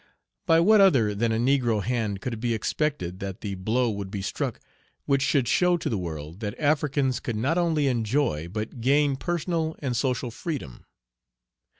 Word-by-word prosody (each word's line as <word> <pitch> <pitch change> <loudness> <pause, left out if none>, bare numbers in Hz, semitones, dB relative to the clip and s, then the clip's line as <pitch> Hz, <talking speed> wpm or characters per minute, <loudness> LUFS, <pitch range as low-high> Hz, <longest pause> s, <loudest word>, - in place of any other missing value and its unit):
By 165 - +5
what 210 +4 +6
other 130 - +4
than 115 +3 0
a 110 - +1
negro 120 -4 +2
hand 110 -4 -2
could 125 - -3
it 115 - -6
be 120 0 0
expected 110 - -2
that 95 -1 -6
the 100 -2 -4
blow 110 +6 0
would 100 -2 -5
be 100 -1 -5
struck - - -3 0.5
which 140 -1 +2
should 135 -2 +2
show 180 +6 +3
to - - -3
the 110 - 0
world 80 0 -6
that 105 -2 -4
Africans 145 -3 +1
could 115 - -4
not 140 +11 +1
only 160 -4 +1
enjoy 115 - 0
but 110 +5 -5
gain 140 +3 +3
personal 165 +1 -2
and 130 -4 -3
social 125 -2 -1
freedom? 120 - -6
125 Hz, 180 wpm, -26 LUFS, 105-145 Hz, 0.5 s, what